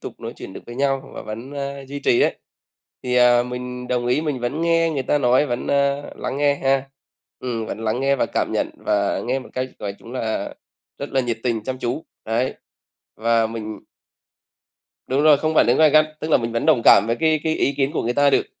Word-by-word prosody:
tục - - -9
nói - - -6
chuyện - - -9
được - - -8
với 120 - -8
nhau 135 +1 -1
và - - -6
vẫn, 115 +6 -7
a, 140 0 -4
duy 140 +2 -7
trì 120 - +3
ấy, - - +2 0.7
thì, 125 -1 -1
à, 120 -1 +5
mình 125 0 -6
đồng 120 -1 0
ý 125 +4 +2
mình 145 -5 -2
vẫn 120 +6 -2
nghe 165 0 +3
người 135 - -1
ta 145 +3 +1
nói, 130 +2 +3
vẫn, 120 -3 -3
ơ, 140 0 0
lắng - - -4
nghe 145 0 +3
ha. 135 0 0 0.5
Ừm, 115 -3 -3
vẫn 110 - -5
lắng 115 +2 -1
nghe 140 +1 +2
và - - +1
cảm - - -2
nhận - - 0
và 100 -1 0
nghe 130 +3 -1
một 130 - -10
cách 130 0 -2
nói 100 -1 -4
chung 115 +4 -12
là 115 -4 -3 0.4
rất 140 - -5
là 135 - +3
nhiệt 120 -3 -2
tình, 115 -3 -1
chăm 130 +3 -4
chú, 125 +6 -3 0.2
đấy. 115 +4 -1 0.6
Và 115 0 +2
mình 110 -1 -6 1.3
Đúng 135 +2 +1
rồi, 155 -2 +7
không 155 +2 -1
phản - - +5
ứng 120 - +4
gay 155 -1 +6
gắt, 155 +1 +5
tức 155 0 -4
là - - +6
mình 115 -1 -3
vẫn 115 +3 -1
đồng 150 -7 +4
cảm - - +7
với 115 - +1
cái 160 -1 +3
cái 160 -1 0
ý 140 - +1
kiến 135 0 +1
của - - -2
người 120 - 0
ta 145 +2 +4
được. - - +2
130 Hz, 235 wpm, -22 LUFS, 120-140 Hz, 1.3 s, rồi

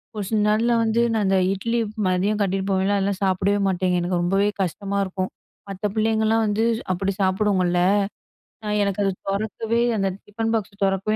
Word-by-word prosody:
ஒரு 205 - -3
சில 220 -2 +1
நாள்ல 220 +3 +2
வந்து 225 +1 +1
நான் 220 -2 +1
அந்த 190 0 +3 0.2
இட்லி 230 +4 -2 0.3
மதியம் 195 +4 +1
கட்டிகிட்டு 195 0 -1
போவேன்ல 190 +2 +1
அதெல்லாம் 200 0 -1
சாப்பிடவே 195 +2 +1
மாட்டேங்க. 185 -1 +1
எனக்கு 175 0 -1
ரொம்பவே 195 +3 +2
கஷ்டமா 200 +3 -3
இருக்கும். 185 0 -3 0.4
மத்த 195 +2 -2
பிள்ளைங்கலாம் 220 0 +2
வந்து 210 +1 0 0.3
அப்படி 195 +2 -1
சாப்புடுங்கல்ல? 185 -2 +2 0.8
நான் 210 0 -1
எனக்கு 200 0 -1
அது 195 - +2 0.2
தொறக்கவே 220 +3 -1 0.2
அந்த 195 -1 +1 0.2
டிஃபன் 225 +2 -2
பாக்ஸை 210 -2 -3
தொறக்கவே 195 +2 0
200 Hz, 160 wpm, -23 LUFS, 190-215 Hz, 0.8 s, அந்த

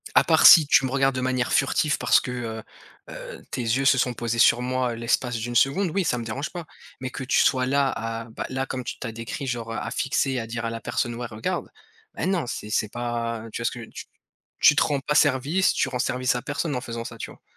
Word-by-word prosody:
À - - +7
part - - +4
si 160 -5 +10
tu 135 - +4
me 130 - -3
regardes 135 0 +2
de 130 - -2
manière 130 -1 -1
furtif 150 -2 +2
parce - - +4
que, 125 - -6
heu 115 -3 -5 0.5
heu, - - -9
tes 130 - -3
yeux 120 +4 0
se 135 - +5
sont 125 0 +1
posés 120 0 -3
sur 120 +1 +5
moi 125 -1 -1
l'espace 120 +1 0
d'une 120 +2 -5
seconde, 140 - +3
oui, 195 +3 0
ça 140 -7 0
me 115 - -5
dérange 130 +7 -4
pas, 175 -2 -7 0.3
mais 130 - -4
que 130 - -6
tu 130 - +2
sois 130 -1 +3
là, 140 +1 +2
à 115 0 -4
bah 115 - -7
là, 130 +1 -2
comme 130 -1 -5
tu - - -6
tu - - -5
as - - -5
décrit, 115 +5 -6
genre, 120 -2 -4
heu, - - -4
à 115 - -4
fixer, 135 0 0
à 115 - -5
dire 115 0 -4
à - - -1
la 115 0 -6
personne: 120 +3 -2
«Ouais, 120 +1 -5
regarde». 110 -1 -4 0.4
Ben 180 - -2
non, 185 -6 0
c'est 105 -3 -6
c'est 105 -1 0
pas, 115 -1 -3
heu, - - -9
tu 115 - -5
vois? - - -3
Ce - - +1
que 120 -2 -8
tu - - -9 0.5
tu - - +6
te - - +4
rends 145 - 0
pas 150 +2 -2
service, 145 +6 +3
tu - - 0
rends 125 - -3
service 125 0 0
à 120 - -2
personne 145 +3 -3
en 125 - -2
faisant 115 0 -6
ça, 115 -2 -8
tu - - -7
vois? - - -17
125 Hz, 265 wpm, -24 LUFS, 115-135 Hz, 0.5 s, si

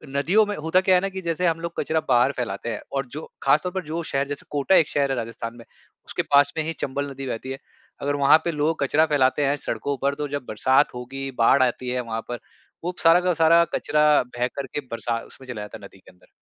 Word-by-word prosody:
नदियों 190 +10 +3
में 205 0 -3
होता 160 +4 +2
क्या 185 -1 +4
है 180 - +3
ना 195 - -1
कि 190 0 -6
जैसे 170 +1 -1
हम 165 0 0
लोग 170 0 -4
कचरा 160 0 0
बाहर 125 +2 +4
फैलाते 120 -1 -3
हैं 110 - -4
और 135 -1 -1
जो 155 - -6 0.2
ख़ासतौर 180 +4 +3
पर 190 -2 -3
जो 165 +2 -3
शहर 140 -2 -1
जैसे 145 - -6
कोटा 145 +6 +2
एक 160 - +4
शहर 140 -1 +1
है 130 - -1
राजस्थान 115 0 -5
में, 115 - -13 0.4
उसके - - -2
पास 145 0 +4
में 160 - +1
ही 165 +1 -3
चंबल 140 +1 -2
नदी 135 0 -6
बहती 125 +2 -4
है। 135 - -4 0.4
अगर 145 0 0
वहाँ 140 +2 +6
पे 170 - +1
लोग 150 +1 0
कचरा 155 +3 +3
फैलाते 145 0 +2
हैं 140 +1 +2
सड़कों 135 +3 -3
पर, 140 0 +1
तो 145 0 -3
जब 145 -3 -4
बरसात 130 +7 +2
होगी, 135 +2 -5
बाढ़ 130 +3 +5
आती 125 0 -1
है 125 0 -1
वहाँ 115 -1 -4
पर, 120 -2 -4 0.4
वो 180 +1 -2
सारा 165 +2 +6
का 180 -1 +1
सारा 165 +1 +5
कचरा 150 0 +2 0.3
बह 125 +1 +1
कर 140 - -3
के 145 - -4
बरसा 115 0 -2
उसमें 130 - -15
चला 110 -4 -5
जाता 105 - -8
है 100 - -11
नदी 95 - -15
के - - -18
अंदर। 90 - -26
140 Hz, 250 wpm, -24 LUFS, 125-160 Hz, 0.4 s, वहाँ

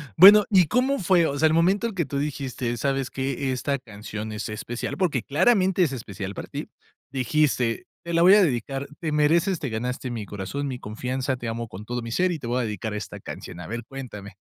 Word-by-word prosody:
Bueno, 205 +3 +10
¿y 185 -5 +6
cómo 260 - +2
fue? 175 -2 +4
O 140 -2 -1
sea, 160 - +5
el 155 - +2
momento 195 +7 +2
que 170 -6 -1
tú 140 +1 -3
dijiste: 130 -4 -3
"¿Sabes 135 +1 -1
qué? 135 0 -2
Esta 140 +2 -1
canción 110 -1 -7
es 105 0 -4
especial, 120 +3 -4
porque 150 - +1
claramente 190 +4 +3
es 155 - +1
especial 100 -5 -6
para - - -6
ti". - - -6 0.4
Dijiste: 130 -2 +1 0.2
"Te 170 0 -5
la 165 - +3
voy 185 +4 +8
a 210 - +6
dedicar, 135 -1 -1
te 160 -2 -2
mereces, 165 +5 +3
te 140 - -3
ganaste 125 +3 -3
mi 115 -3 -4
corazón, 105 +9 -4
mi 130 -2 -4
confianza, 130 +5 -3
te 120 -1 -6
amo 115 0 -3
con 100 0 -9
todo 120 +1 -3
mi 115 - -6
ser 180 +8 +2
y 170 - -2
te 125 - -8
voy 125 +2 0
a - - -1
dedicar 105 0 -4
esta 105 -3 -6
canción". 85 - -8
A 90 - -7
ver, 120 +1 -4
cuéntame. 110 -7 -8
135 Hz, 220 wpm, -25 LUFS, 115-165 Hz, 0.4 s, Bueno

